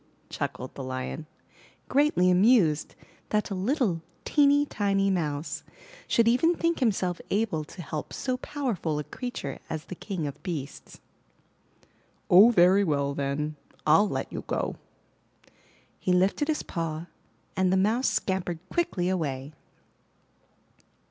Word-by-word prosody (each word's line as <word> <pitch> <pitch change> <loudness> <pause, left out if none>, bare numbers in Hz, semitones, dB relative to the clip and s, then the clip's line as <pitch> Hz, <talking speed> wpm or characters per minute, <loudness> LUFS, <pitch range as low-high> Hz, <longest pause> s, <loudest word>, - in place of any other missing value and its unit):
chuckled 130 - -4
the 135 - -7
Lion, 130 +4 -5 0.6
greatly 270 -11 +3
amused 180 -5 +4 0.3
that 210 -1 0
a - - 0
little 195 - 0 0.2
teeny, 290 0 +4
tiny 195 -5 +1
Mouse 150 -3 -2 0.5
should 230 -1 +3
even 290 +9 +4
think 335 0 0
himself 190 -8 0
able 200 -7 0
to 175 - -9
help 150 0 -5
so 255 -2 -2
powerful 240 - -2
a 150 - -2
creature 245 - -6
as 155 -1 -4
the - - -7
King 185 -3 -4
of 140 - -6
Beasts. 150 -6 -6 1.3
*'0h, 200 +7 +9
very 185 0 +5
well 140 -5 0
then, 145 +2 -2 0.3
Fll 180 +7 +5
let - - -3
you - - -4
go!'' - - -2 1.2
He 185 - 0
lifted 190 +11 +2
his 310 -1 0
paw, 165 -1 -4 0.5
and 185 -1 +2
the 190 - +3
Mouse 220 +7 +2
scampered 185 -3 -1
quickly 325 - 0
away. 145 -6 -2
185 Hz, 130 wpm, -27 LUFS, 155-230 Hz, 1.3 s, 0h